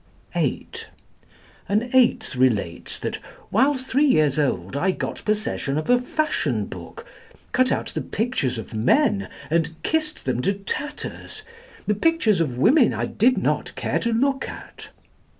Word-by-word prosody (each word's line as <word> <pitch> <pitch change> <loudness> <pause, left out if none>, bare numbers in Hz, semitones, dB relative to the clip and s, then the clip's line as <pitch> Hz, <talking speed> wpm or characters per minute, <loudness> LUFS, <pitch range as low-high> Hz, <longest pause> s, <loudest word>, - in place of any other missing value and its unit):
(8) - - -2 0.8
An 220 +5 0
eighth 240 - +3
relates 115 -9 0
that - - -3 0.3
"while 265 +7 +4
three 265 +3 +1
years 155 - +3
old, 95 -7 -1
I 180 +7 +1
got 185 - -3
possession 210 -9 -1
of 155 +10 0
a 245 0 +4
fashion 310 +5 0
book, 460 - -10 0.5
cut 255 0 +3
out - - -1
the - - -3
pictures 215 - -1
of 110 - -7
men, 200 - +2 0.2
and 165 -1 +1
kissed 310 -1 -1
them 125 -2 0
to 195 +8 +1
tatters. 290 - -5 0.4
The 210 - +2
pictures 220 - +2
of 130 -7 -1
women 240 - +4
I - - -1
did 250 +4 +2
not - - -1
care - - -1
to 235 - -1
look 270 +4 +1
at." - - -10
215 Hz, 150 wpm, -23 LUFS, -, 0.8 s, while